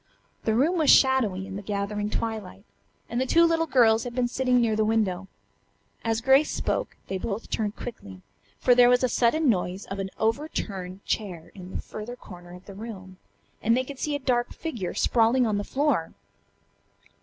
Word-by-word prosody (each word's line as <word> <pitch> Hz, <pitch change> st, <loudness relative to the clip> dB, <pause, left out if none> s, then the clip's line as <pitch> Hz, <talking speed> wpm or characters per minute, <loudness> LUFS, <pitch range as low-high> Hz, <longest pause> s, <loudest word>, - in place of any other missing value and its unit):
The 220 Hz, -, +2 dB
room 325 Hz, +9 st, +2 dB
was 305 Hz, -, +3 dB
shadowy 230 Hz, -9 st, +4 dB
in 195 Hz, 0 st, -7 dB
the -, -, -6 dB
gathering 205 Hz, +1 st, -3 dB
twilight, 215 Hz, -, -4 dB, 0.4 s
and 235 Hz, +2 st, -2 dB
the 260 Hz, -, -1 dB
two 335 Hz, +4 st, +5 dB
little 330 Hz, 0 st, +1 dB
girls 230 Hz, -5 st, +4 dB
had 245 Hz, -1 st, -6 dB
been 250 Hz, -1 st, +1 dB
sitting 250 Hz, 0 st, +1 dB
near 225 Hz, -2 st, +2 dB
the 215 Hz, -, +2 dB
window. 205 Hz, -4 st, 0 dB, 0.8 s
As 225 Hz, 0 st, 0 dB
Grace 270 Hz, +4 st, +4 dB
spoke -, -, -2 dB
they 190 Hz, -, -3 dB
both 205 Hz, +3 st, -5 dB
turned 215 Hz, -1 st, -1 dB
quickly, 95 Hz, -, -9 dB, 0.3 s
for 250 Hz, -, +4 dB
there 245 Hz, 0 st, +6 dB
was 250 Hz, +1 st, +3 dB
a -, -, +4 dB
sudden 270 Hz, +7 st, +2 dB
noise 185 Hz, -3 st, 0 dB
of 195 Hz, +1 st, -6 dB
an 195 Hz, 0 st, -3 dB
overturned 200 Hz, -, -3 dB
chair 180 Hz, -7 st, -3 dB
in 185 Hz, -2 st, -10 dB
the -, -, -4 dB
further 215 Hz, +3 st, -7 dB
corner 175 Hz, -6 st, -12 dB
of 180 Hz, -, -14 dB
the 200 Hz, -, -10 dB
room, 190 Hz, -3 st, -9 dB, 0.4 s
and 230 Hz, +2 st, +3 dB
they 255 Hz, -, +1 dB
could 270 Hz, 0 st, -9 dB
see 300 Hz, -1 st, -1 dB
a -, -, -2 dB
dark 245 Hz, -3 st, 0 dB
figure 235 Hz, -, -5 dB
sprawling 240 Hz, +2 st, +3 dB
on 210 Hz, -2 st, 0 dB
the -, -, -2 dB
floor. 270 Hz, -, 0 dB
225 Hz, 190 wpm, -26 LUFS, 195-255 Hz, 0.8 s, there